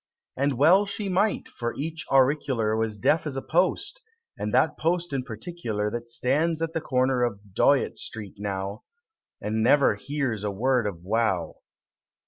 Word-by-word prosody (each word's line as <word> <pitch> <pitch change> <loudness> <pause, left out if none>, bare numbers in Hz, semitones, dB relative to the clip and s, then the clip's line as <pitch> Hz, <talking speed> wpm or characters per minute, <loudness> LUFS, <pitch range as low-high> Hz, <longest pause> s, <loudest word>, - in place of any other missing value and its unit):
And 140 -1 0
well 185 +9 +5
she 200 0 -3
might! 195 +4 +1
for 120 -1 -4
each 160 +1 -4
auricular 130 -5 +2
Was 110 -1 -1
deaf 155 +10 +2
as 140 - -4
a - - -2
post 190 - 0 0.3
and - - -3
that - - +3
post 170 -1 -1
in 135 - 0
particular 110 -3 -4
That 120 +1 -5
stands 150 +7 +1
at 165 0 -3
the 165 - -1
corner 130 -3 +1
of 100 -5 -3
Dyott 140 +6 +2
Street 105 -4 -7
now, 100 0 -4 0.6
And 110 +2 -1
never 140 +5 +5
hears 135 -7 -3
a 105 - 0
word 120 +3 +1
of 100 - -3
a 85 - -18
row! 105 -6 0
130 Hz, 165 wpm, -26 LUFS, 110-155 Hz, 0.6 s, well